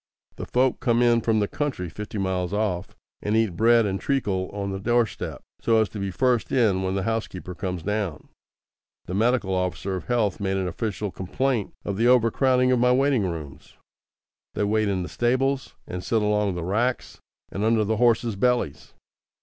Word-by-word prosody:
The - - -6
folk 130 +1 +1
come 120 -2 +2
in 120 -1 +4
from 110 -1 +2
the 100 - +1
county 140 -11 -3
fifty 105 +6 -7
miles 95 -1 -1
off, 100 -4 -2 0.3
and 105 +1 0
eat 110 -6 +1
bread 115 +3 +4
and 95 -2 -2
treacle 100 -9 -1
on 100 -1 -4
the 95 - -4
doorstep, 120 +2 -1 0.2
so 115 -1 +3
as 110 - +1
to 105 - -7
be 100 0 -2
first 125 +4 +1
in 110 -7 +3
when 95 0 -1
the 95 - -1
housekeeper 105 -4 -3
comes 90 -2 -4
down. 105 -7 -3 0.8
The 90 - -6
medical 110 -1 +1
officer 90 +1 -1
of 90 - -6
health 115 -5 0
made 95 -1 -1
an 95 -1 -1
official 100 +2 -3
complaint 115 +5 -2
of 100 -1 -2
the 115 +2 +3
over 120 -2 +5
crowding 130 0 +3
of 125 - +3
my 125 +1 +4
waiting 130 -5 +2
rooms. 75 -5 -8 0.8
They - - 0
wait 110 +1 +1
in 95 -2 -1
the - - -5
stables, 130 +3 0
and 90 0 -6
sit 115 -5 +1
along 105 -2 +1
the 85 - -4
racks 115 +8 -1 0.3
and 100 - -3
under 110 0 +3
the 110 +1 0
horses' 115 -1 +2
bellies. 100 - -1
105 Hz, 190 wpm, -25 LUFS, 95-120 Hz, 0.8 s, over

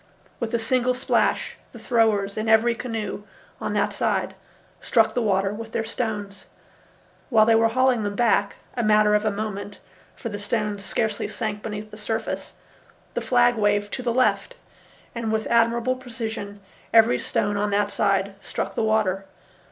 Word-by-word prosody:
With 230 -2 -3
a - - +4
single 250 +2 +1
splash 255 +2 0 0.2
the - - -9
throwers 215 -4 +1
in 215 +1 -2
every 225 +2 +5
canoe 225 -3 -4 0.4
on - - -3
that - - +1
side - - 0 0.5
struck 225 -2 +2
the 245 - 0
water 195 -2 +1
with 225 +1 -8
their 225 - 0
stones. 210 -3 -4 0.8
While 220 -4 +5
they 225 - +5
were 225 0 +5
hauling 255 0 +2
them 205 -1 -3
back—a 230 +1 0
matter 210 -1 +4
of 210 +1 +2
a - - +3
moment, 205 -1 -5 0.4
for 230 - -6
the 205 -1 -5
stones 210 -1 -2
scarcely 220 0 -1
sank 215 -2 -4
beneath 215 0 -6
the 210 - -10
surface—the 220 +1 -6
flag 245 -1 +3
waved 205 -1 +1
to - - -3
the 245 -1 0
left, 255 - +1 0.6
and 230 -2 -3
with 220 0 0
admirable 235 +2 +2
precision 225 -5 -6 0.3
every 225 +1 +5
stone 205 - -1
on 205 +1 0
that 205 0 +1
side 195 0 +1
struck 195 - -4
the - - -1
water. 210 -3 +1
220 Hz, 160 wpm, -24 LUFS, 205-235 Hz, 0.8 s, every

